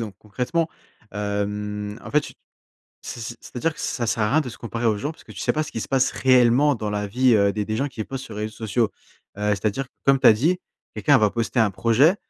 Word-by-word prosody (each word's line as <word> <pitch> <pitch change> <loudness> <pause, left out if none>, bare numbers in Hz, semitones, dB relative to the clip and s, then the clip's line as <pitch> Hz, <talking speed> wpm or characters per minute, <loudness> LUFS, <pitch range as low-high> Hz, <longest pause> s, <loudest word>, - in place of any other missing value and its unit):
Donc, 110 -3 -5
concrètement, 125 - -1 0.4
hem, 105 0 -3
en - - -7
fait, 150 - +4
tu - - -9 0.7
c'est - - -7
c'est 115 +1 -6
c'est-à-dire 140 +6 -2
que - - -11
ça 120 - -2
sert 110 0 0
à - - 0
rien 155 - +4
de 125 - -6
se 120 - -12
comparer 115 0 -5
aux 110 -3 +2
gens 145 +6 -2
parce 160 - -14
que - - -12
tu - - -11
sais - - +1
pas 155 - +1
ce 155 - -8
qui 115 - -3
se - - -5
passe 135 -1 +2
réellement 130 +2 +4
dans 110 -2 -3
la 105 0 -2
vie, 125 +5 +3
heu, 100 -1 +4
des 105 +1 -2
des 110 +1 -3
gens 140 +5 0
qui 115 -5 -5
postent 135 +2 -6
sur 110 - -9
les 105 - -4
réseaux 110 0 -4
sociaux. 110 0 0 0.5
Heu, 105 0 0
c'est 100 - -9
à 105 - +4
dire, 135 +6 -4 0.2
comme 135 0 +5
tu - - +4
as - - +10
dit, 160 +12 +1 0.4
quelqu'un 145 -2 +4
va 105 -5 +3
poster 115 +1 0
un 110 - +4
projet, 120 - +3
115 Hz, 270 wpm, -23 LUFS, 105-135 Hz, 0.7 s, as